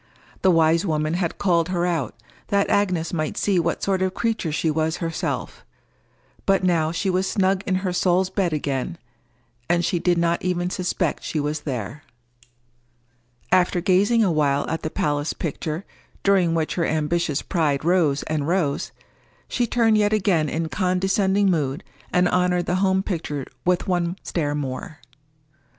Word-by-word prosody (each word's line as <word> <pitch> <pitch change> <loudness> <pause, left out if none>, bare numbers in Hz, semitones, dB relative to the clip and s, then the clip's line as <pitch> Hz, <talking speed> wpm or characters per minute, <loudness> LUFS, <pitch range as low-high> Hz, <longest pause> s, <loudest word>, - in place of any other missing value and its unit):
The 190 - +4
wise 165 -1 +4
woman 155 -3 0
had 175 -1 -1
called 170 -3 +2
her 175 -1 0
out, 165 -7 -1 0.3
that 200 0 +1
Agnes 180 -5 +1
might 155 -3 -2
see 195 -3 +2
what 170 0 -1
sort 190 -1 +1
of 190 0 0
creature 225 -8 -1
she 155 +2 0
was 160 +1 0
herself; 165 -2 -3 0.8
but 195 -1 +3
now 165 -3 +2
she 170 +4 -2
was 185 +1 0
snug 190 -1 +1
in 185 - +1
her 180 - 0
soul's 180 +1 +2
bed 190 -3 0
again, 145 +2 -2 0.7
and 175 -1 +2
she 175 - 0
did 175 0 +2
not 170 0 +1
even 180 0 -1
suspect 180 -3 -1
she 155 - -2
was 150 +1 -2
there. 125 +2 -4 1.5
After 180 -1 +3
gazing 200 +5 +3
a 190 - +2
while 145 -3 +1
at 160 - -2
the 155 - -3
palace 145 -1 -1
picture, 160 +2 -4 0.4
during 185 -4 +3
which 160 -1 0
her 170 - 0
ambitious 155 -1 0
pride 155 -5 0
rose 165 -6 +2
and 150 -2 -2
rose, 170 -5 0 0.6
she 240 - 0
turned 225 -2 +3
yet 205 0 +2
again 185 -7 +2
in 160 +3 -2
condescending 190 +2 +1
mood, 145 -4 -1 0.3
and 180 0 +3
honored 180 -1 +1
the 180 - 0
home 190 -1 +2
picture 150 -8 -3 0.2
with 180 0 +1
one 175 -1 0
stare 145 -4 -1
more. 140 +2 -5
175 Hz, 160 wpm, -23 LUFS, 155-185 Hz, 1.5 s, The